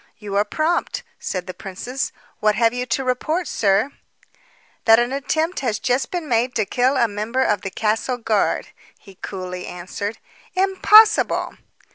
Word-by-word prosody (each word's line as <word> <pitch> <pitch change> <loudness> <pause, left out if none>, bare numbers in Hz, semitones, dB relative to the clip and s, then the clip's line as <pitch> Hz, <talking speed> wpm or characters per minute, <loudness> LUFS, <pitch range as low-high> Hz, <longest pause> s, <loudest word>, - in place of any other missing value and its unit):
"You 205 -2 -6
are 205 - +4
prompt," 310 +10 -1 0.2
said 180 -2 -4
the 185 - -6
princess 195 +8 -5 0.3
"What 215 -1 +2
have 230 0 +3
you 250 0 -3
to 250 +3 0
report, 305 +7 -1
sir?" 205 +5 +1 0.9
"That 225 0 +7
an 240 +2 +1
attempt 315 +5 -1
has 235 -6 -1
just 250 +3 0
been 350 -4 -4
made 245 0 +1
to 215 - +1
kill 255 +6 +1
a 235 -2 +4
member 220 +5 -1
of 205 -2 +1
the 195 - -4
castle 220 +5 -1
guard," 225 -3 0 0.3
he 195 - -16
coolly 180 -2 -6
answered. 200 +5 -5 0.4
"Impossible!" 405 +3 +5
230 Hz, 155 wpm, -21 LUFS, 205-265 Hz, 0.9 s, That